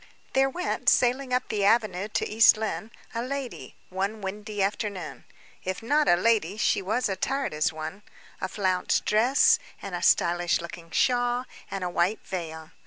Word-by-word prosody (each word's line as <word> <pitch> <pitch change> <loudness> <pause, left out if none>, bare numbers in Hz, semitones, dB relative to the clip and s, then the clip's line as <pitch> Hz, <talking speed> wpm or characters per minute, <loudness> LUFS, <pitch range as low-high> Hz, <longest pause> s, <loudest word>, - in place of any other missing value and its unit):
There 270 0 +3
went, 360 +7 0
sailing 255 +1 +2
up 250 0 0
the 205 -2 -1
avenue 205 -3 +2
to 215 - -1
East 220 0 +6
Lynne, 220 0 -3 0.2
a 230 - -2
lady, 265 0 -5
one 195 +4 -2
windy 205 +1 -3
afternoon. 200 -1 -3 0.4
If 185 +4 -4
not 295 +5 +2
a - - +6
lady, 210 -1 +1
she 215 - +2
was 220 +6 0
attired 270 - -2
as 155 +2 +1
one; 160 +5 -7 0.4
a - - -1
flounced 185 -2 0
dress, 270 - +4 0.2
and 195 - -7
a 175 - -3
stylish 175 0 +3
looking 170 0 -9
shawl, 245 +5 +1 0.2
and 195 -1 -4
a - - -1
white 180 +5 0
veil. 160 -3 -6
210 Hz, 165 wpm, -26 LUFS, 180-245 Hz, 0.4 s, East